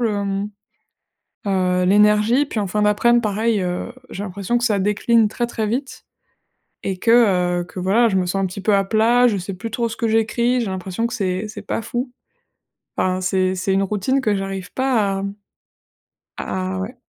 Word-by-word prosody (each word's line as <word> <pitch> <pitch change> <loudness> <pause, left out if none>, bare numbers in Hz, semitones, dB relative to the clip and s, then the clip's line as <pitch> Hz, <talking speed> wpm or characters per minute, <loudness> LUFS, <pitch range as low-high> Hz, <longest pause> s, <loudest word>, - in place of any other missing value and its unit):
le, 210 -4 0
mmh, 200 +1 -2 1.0
heu, 180 -2 +1
l'énergie. 210 +6 +4
Puis 225 - -3
en 200 - -1
fin 210 +3 -1
d'aprèm, 235 +3 +3
pareil, 215 0 0
heu, 180 +6 -3 0.2
j'ai 195 - -5
l'impression 200 +5 -1
que 240 - -2
ça 210 -4 +2
décline 210 +3 +2
très, 240 +2 -2
très 225 -2 -3
vite 260 +6 -4 0.8
et 190 -1 -2
que, 230 - +2 0.5
heu, - - -3
que 180 - -9
voilà, 215 +6 +3
je 190 - +1
me 185 - +1
sens 195 +2 -1
un - - +2
petit 185 +2 -7
peu 205 +1 +3
à 195 - +3
plat. 230 +4 +3
Je 205 - -1
sais 185 +2 -5
plus 225 +4 -6
trop 235 0 -1
ce - - -6
que 230 - 0
j'écris. 235 +3 +1
J'ai 225 - -2
l'impression 190 +4 -3
que 235 - -7
c'est 195 -2 -2
c'est 210 -1 -8
pas 225 - -2
fou. 245 +3 -4 0.9
Enfin, 185 0 +1
c'est 185 0 +1
c'est 190 +1 -1
une 195 0 +2
routine 210 +7 0
que 210 -4 +1
j'arrive 195 -1 -5
pas 225 -7 +1
à, 195 - -4
mmh, 200 0 -4 1.0
à 185 0 -3
ouais. 215 +7 -5
210 Hz, 200 wpm, -20 LUFS, 190-230 Hz, 1.0 s, l'énergie